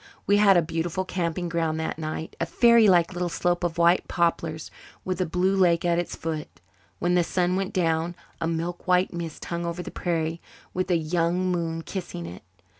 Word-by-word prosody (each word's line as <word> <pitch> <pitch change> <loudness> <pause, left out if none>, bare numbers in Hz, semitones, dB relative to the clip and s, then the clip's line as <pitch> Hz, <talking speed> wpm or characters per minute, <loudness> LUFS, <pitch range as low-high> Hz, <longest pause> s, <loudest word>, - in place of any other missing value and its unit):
We 205 - +4
had 200 -3 +6
a 170 - +4
beautiful 165 +3 -2
camping 175 -1 -2
ground 165 -2 -1
that 160 0 -3
night 155 0 -5
a - - 0
fairylike 210 -8 +5
little 175 0 -2
slope 175 +1 0
of 170 -2 -1
white 170 +1 +4
poplars 165 -2 -1 0.3
with 185 -1 -2
a 180 - 0
blue 185 +4 +1
lake 175 -2 +3
at 170 0 +2
its 175 - -3
foot. 160 -2 -5 0.4
When 175 0 0
the 175 -1 +4
sun 180 +1 0
went 190 0 -1
down 165 -1 0 0.2
a 165 - -1
milk 170 +2 -3
white 180 0 +3
mist 170 -2 -6
hung 170 0 -3
over 170 +1 -3
the - - -7
prairie, 165 -1 -2 0.3
with 185 +1 -2
a 175 - +4
young 170 +3 0
moon 165 -2 -2
kissing 170 - -6
it. 85 +1 -9
170 Hz, 190 wpm, -25 LUFS, 165-180 Hz, 0.4 s, had